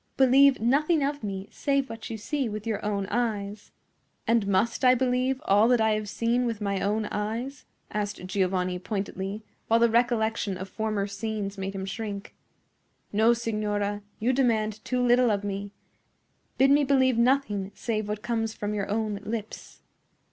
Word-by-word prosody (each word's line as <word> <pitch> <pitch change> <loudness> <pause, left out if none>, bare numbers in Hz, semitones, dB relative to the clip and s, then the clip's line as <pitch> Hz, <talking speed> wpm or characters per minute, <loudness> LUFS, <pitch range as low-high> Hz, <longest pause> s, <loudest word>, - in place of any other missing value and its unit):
Believe 270 +1 +6
nothing 290 +7 +2
of 285 -1 -2
me 195 -1 -4
save 275 -2 0
what 225 -2 -8
you 225 - -4
see 270 +3 -2
with 215 0 -6
your 220 -2 -2
own 205 -2 -1
eyes." 210 -3 -2 0.5
"And 230 -3 +2
must 200 +6 +1
I 255 0 +7
believe 255 +1 +1
all 205 +3 +5
that 245 -1 +4
I 220 0 +3
have 215 -1 -1
seen 235 +3 0
with 225 -3 -3
my 200 -2 -1
own 210 +2 0
eyes?" 230 +7 -4 0.3
asked 205 -3 -3
Giovanni, 185 -1 0
pointedly, 195 +1 -4 0.2
while 230 +1 +4
the 235 -1 +4
recollection 225 -4 +1
of 190 +1 -7
former 215 -1 -1
scenes 205 0 -4
made 195 0 -5
him 190 0 -3
shrink. 200 0 -5 0.8
"No, 220 +3 +5
signora; 210 -3 -2 0.2
you 245 +4 +1
demand 220 -5 +1
too 250 -1 0
little 245 0 +4
of 205 -1 0
me. 200 0 -4 0.9
Bid 270 +2 +5
me 290 +1 +5
believe 260 -3 +3
nothing 235 -6 +1
save 215 -3 -2
what 210 0 -4
comes 225 -2 -1
from 205 0 -3
your 205 -1 -2
own 210 -1 -1
lips." 220 -1 -6
220 Hz, 165 wpm, -27 LUFS, 205-245 Hz, 0.9 s, I